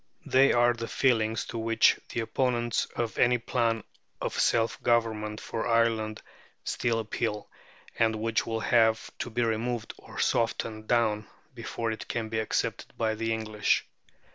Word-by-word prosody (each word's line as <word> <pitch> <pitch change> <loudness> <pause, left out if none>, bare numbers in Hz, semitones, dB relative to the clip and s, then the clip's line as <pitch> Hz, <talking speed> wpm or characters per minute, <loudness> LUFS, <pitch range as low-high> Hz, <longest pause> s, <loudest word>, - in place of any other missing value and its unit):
They 135 +1 +5
are 120 0 +4
the 115 -1 -5
feelings 115 -3 +1
to 115 - -5
which 115 0 +4
the 120 - -2
opponents 120 0 0
of 115 -2 -2
any 125 0 +5
plan 115 -2 0 0.4
of - - -3
self 115 -1 +1
government 110 -2 +1
for 115 - -4
Ireland 115 -2 +1 0.4
still 120 -1 0
appeal, 110 -1 -3 0.5
and 110 -1 +3
which 110 +1 0
will 115 -1 -2
have 110 -2 +2
to - - -3
be 120 +1 0
removed 115 +1 -1
or - - -13
softened 110 -1 0
down 110 -3 +1 0.3
before 115 -1 -3
it 110 - -6
can 115 -2 -3
be 110 0 -1
accepted 110 - -2
by 110 -1 +1
the 115 +1 -2
English. 110 -1 0
115 Hz, 150 wpm, -28 LUFS, 110-120 Hz, 0.5 s, They